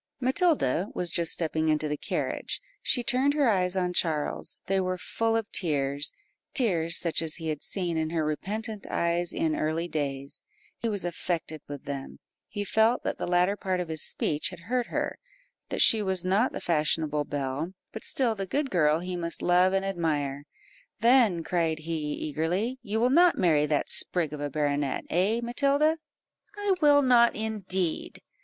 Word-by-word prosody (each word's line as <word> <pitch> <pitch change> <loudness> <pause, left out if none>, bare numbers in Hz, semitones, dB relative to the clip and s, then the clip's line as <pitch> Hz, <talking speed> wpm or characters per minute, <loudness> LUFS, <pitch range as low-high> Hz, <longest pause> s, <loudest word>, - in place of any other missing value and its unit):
Matilda 260 - +1
was 175 -2 -1
just 170 -2 +1
stepping 160 -1 0
into 155 0 +1
the 150 - -1
carriage; - - -3 0.2
she 245 - +2
turned 265 +4 +2
her 290 -3 +3
eyes 185 -3 +2
on 180 -1 0
Charles 155 -4 0
they 195 0 +1
were 185 -1 -1
full 225 +7 -1
of 225 -2 -2
tears, 145 -4 0 0.4
tears 170 - +3
such 170 -2 +2
as 160 -1 +1
he 165 -2 -4
had 150 -2 -3
seen 175 -4 -2
in 160 0 -1
her 160 -2 -1
repentant 210 +7 -4
eyes 170 0 0
in 155 -1 0
early 160 +2 -1
days; 140 -4 -4 0.3
he 230 - -3
was 205 -4 0
affected 165 -2 -3
with 145 -2 -8
them 140 -1 -6 0.3
he 205 -1 -4
felt 220 +4 +2
that - - -3
the - - -3
latter 180 +3 +2
part 185 -3 -2
of 175 -2 -4
his 160 -1 0
speech 155 +7 +1
had 180 -2 -11
hurt 240 +6 -1
her - - -3 0.5
that - - +3
she 220 - +6
was 190 -2 0
not 200 +7 +2
the - - -5
fashionable 155 -2 0
belle, 145 +4 -3 0.2
but 220 - -8
still 250 -4 +1
the 195 -3 -5
good 280 +5 -1
girl 155 -2 +3
he 180 0 -4
must 170 -1 -1
love 180 +1 +4
and 195 0 0
admire. 150 -7 -2 0.6
"Then," 230 -8 +4
cried 165 -2 0
he, 155 -2 -3
eagerly, 175 - -2
"you 220 -1 -2
will 245 +2 +2
not 345 +4 +5
marry 155 -4 +3
that 150 -1 0
sprig 165 -5 +2
of 150 - -6
a 145 - -2
baronet 145 -1 -1
eh, 200 +7 +1
Matilda?" 285 +6 +2 0.6
"I 410 -1 +1
will 290 -1 +5
not 240 -2 +5
indeed." 190 -6 -3
175 Hz, 175 wpm, -27 LUFS, 155-220 Hz, 0.6 s, she